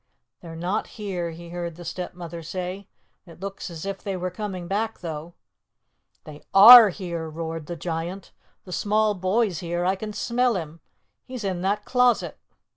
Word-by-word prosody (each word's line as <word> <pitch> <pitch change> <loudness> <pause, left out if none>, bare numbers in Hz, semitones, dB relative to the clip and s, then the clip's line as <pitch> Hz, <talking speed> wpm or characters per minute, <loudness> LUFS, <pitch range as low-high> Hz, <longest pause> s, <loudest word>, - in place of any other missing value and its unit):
"They're 165 -2 -9
not 180 +6 -2
here," 185 -5 -3
he 170 +1 -10
heard 170 -1 -5
the 175 +1 -11
Stepmother 175 -2 -6
say. 185 +4 -5 0.4
"It 165 - -14
looks 195 0 -6
as 165 0 -8
if 195 -1 -4
they 195 -2 -3
were 180 0 -3
coming 185 -3 -5
back, 220 +4 -2
though." 165 0 -6 0.9
"They 150 -1 -11
are 225 +2 +11
here," 170 -4 -5
roared 160 0 -5
the 175 - -4
Giant. 170 +3 -5 0.3
"The 180 - -8
small 215 +3 +2
boy's 190 -1 0
here. 175 0 -2
I 190 +1 +2
can 210 +2 -6
smell 240 +3 0
him. 165 -2 -5 0.4
He's 255 -3 -7
in 185 -3 -2
that 205 +2 -1
closet." 250 -2 +2
180 Hz, 165 wpm, -24 LUFS, 170-205 Hz, 0.9 s, are